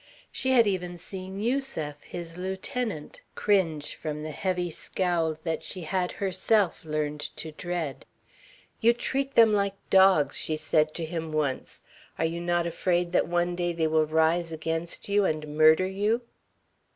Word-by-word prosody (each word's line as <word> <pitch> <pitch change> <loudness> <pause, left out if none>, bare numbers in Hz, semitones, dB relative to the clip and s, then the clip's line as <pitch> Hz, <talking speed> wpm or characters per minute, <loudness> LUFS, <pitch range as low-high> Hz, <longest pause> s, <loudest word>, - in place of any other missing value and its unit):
She 260 - -1
had 235 -3 +6
even 180 -3 -2
seen 190 +2 -7
Yusef, 215 - -2
his 170 -1 -8
lieutenant, 190 -1 -4
cringe 165 -8 +1
from 150 -1 -5
the 155 - -4
heavy 180 +2 -1
scowl 165 -2 -1
that 165 -2 -2
she 185 - -6
had, 180 +2 -1
herself, 195 0 +1
learned 150 -1 -2 0.2
to 155 +1 -6
dread. 165 -3 -4 0.7
"You 235 +1 +5
treat 270 +3 -2
them 225 -2 +7
like 200 -1 +1 0.2
dogs," 190 -6 +5
she 155 - -1
said 155 0 +1
to 165 - -2
him 160 -1 -4
once. 150 -4 -2 0.3
"Are 160 - +1
you 170 +1 -2
not 175 0 +1
afraid 175 +1 0
that - - +2
one 175 0 0
day 175 -1 -1
they 165 -1 0
will 155 0 +2
rise 160 +2 +2
against 165 +1 -3
you 205 0 +3
and 155 -4 -2
murder 155 +3 +6
you?" 205 +5 0
175 Hz, 155 wpm, -27 LUFS, 155-190 Hz, 0.7 s, them